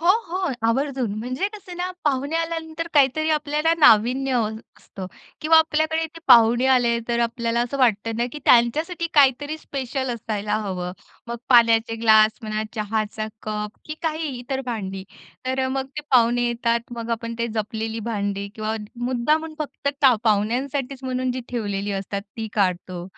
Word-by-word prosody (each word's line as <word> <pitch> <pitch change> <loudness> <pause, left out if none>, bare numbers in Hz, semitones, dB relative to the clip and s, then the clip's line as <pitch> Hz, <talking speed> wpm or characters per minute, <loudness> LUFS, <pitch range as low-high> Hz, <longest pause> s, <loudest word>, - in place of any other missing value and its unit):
हो, 340 - +1 0.2
हो. 365 -2 -2
आवर्जून 260 -2 0
म्हणजे 255 - -2
कसं 370 -4 -10
ना, 360 +1 -2
पाहुणे 285 +2 0
आल्यानंतर 330 0 -3
काहीतरी 295 +2 +3
आपल्याला 300 +1 +1
नाविन्य 255 +1 +5
हवं 220 -3 0 0.2
असतं 190 -2 -9 0.3
किंवा 320 +1 +6
आपल्याकडे 320 0 +1
ते 330 - -10
पाहुणे 240 0 +6
आले 245 -3 +3
तर 235 0 0
आपल्याला 235 0 0
असं 245 +3 -2
वाटतं 225 -3 +2
ना, 235 +1 0
की 300 - -6
त्यांच्यासाठी 310 +9 +3
काहीतरी 290 +1 +4
स्पेशल 265 -2 -4
असायला 210 -2 -3
हवं. 180 -2 -3 0.3
मग 235 0 -4
पाण्याचे 230 -2 +5
ग्लास 220 -1 +5
म्हणा, 215 0 -2
चहाचा 215 0 -2 0.2
कप, 210 -1 -3
की 305 - -6
काही 320 -1 -1
इतर 265 +2 -3
भांडी. 195 -5 -4 0.4
तर 260 +1 0
अ, - - -1
मग 265 0 -2
ते 300 - -3
पाहुणे 240 -1 +4
येतात. 235 0 0 0.2
मग 230 0 -5
आपण 230 0 -3
ते 235 - 0
जपलेली 220 +1 -3
भांडी 200 -2 -2
किंवा 220 0 -2 0.3
मुद्दामून 300 +6 0
फक्त 295 -2 -3 0.4
पाहुण्यांसाठीच 255 +5 0
म्हणून 255 0 -1
जी 255 - -4
ठेवलेली 205 -4 -3
असतात 195 0 -4
ती 225 -1 -4
काढतो. 180 -3 -1
240 Hz, 155 wpm, -23 LUFS, 220-285 Hz, 0.4 s, किंवा